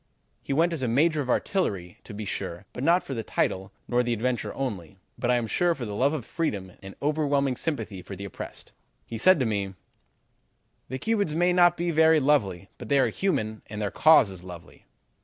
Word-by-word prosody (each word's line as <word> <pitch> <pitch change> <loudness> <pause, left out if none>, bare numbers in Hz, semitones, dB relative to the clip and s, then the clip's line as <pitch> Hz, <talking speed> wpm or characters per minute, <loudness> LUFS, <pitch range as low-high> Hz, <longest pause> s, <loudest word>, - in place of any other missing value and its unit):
He - - -6
went 165 +5 +2
as 160 - -2
a 130 - 0
Major 150 +6 +2
of 130 - -5
Artillery 100 - -1
to 115 - -9
be 105 0 -5
sure, 95 -1 -5
but 125 - -5
not 170 +4 +4
for 135 - -6
the 115 - -2
title, 95 -2 -1 0.2
nor 120 0 +2
the 120 -1 0
adventure 120 +1 -1
only, 100 -9 -4 0.2
but 120 0 -2
I 125 - +4
am 120 -1 0
sure 170 +9 +1
from 120 -4 -5
love 130 +7 +1
of - - -5
freedom 100 - -3
and 95 0 -10
overwhelming 145 -3 +1
sympathy 115 - -3
for 100 +2 -8
the 100 +2 -7
oppressed. 100 - -8 0.3
He 115 - -6
said 185 +5 +5
to - - +2
me: 100 -3 -2 1.1
"'The 130 - -3
Cubans 205 -3 0
may 175 +2 +3
not 175 -1 +5
be 175 0 0
very 160 0 +5
lovely, 100 -11 +1
but - - -8
they 140 - +4
are 130 -3 +3
human, 110 - -1
and 105 0 -6
their 105 -2 -2
cause 155 -10 +5
is 90 -2 -10
lovely.' 90 -1 -12
125 Hz, 210 wpm, -26 LUFS, 100-155 Hz, 1.1 s, said